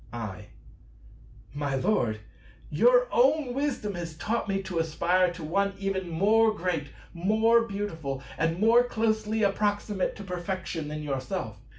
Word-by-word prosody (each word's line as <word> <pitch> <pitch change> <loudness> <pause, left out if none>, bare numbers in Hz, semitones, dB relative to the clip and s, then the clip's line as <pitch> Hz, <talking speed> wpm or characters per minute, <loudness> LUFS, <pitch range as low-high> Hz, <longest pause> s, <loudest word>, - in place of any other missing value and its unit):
I. 105 -3 -6 1.1
My 145 -1 -2
Lord, 125 - 0 0.5
your - - +5
own 310 - +3
wisdom 265 -7 -2
has 170 -3 -6
taught 220 +6 -2
me 195 0 -1
to 185 -3 -3
aspire 170 +3 +2
to 165 - -9
One 200 +5 0
even 195 -2 -2
more 215 +6 +4
great, 170 -6 -2 0.3
more 220 +6 +3
beautiful, 165 - -4
and 165 +3 0
more 230 +3 +5
closely 220 -2 0
approximate 205 -1 0
to 205 - -8
Perfection 180 -3 -4
than 150 0 -5
yourself. 130 -6 -3
190 Hz, 130 wpm, -27 LUFS, 160-215 Hz, 1.1 s, your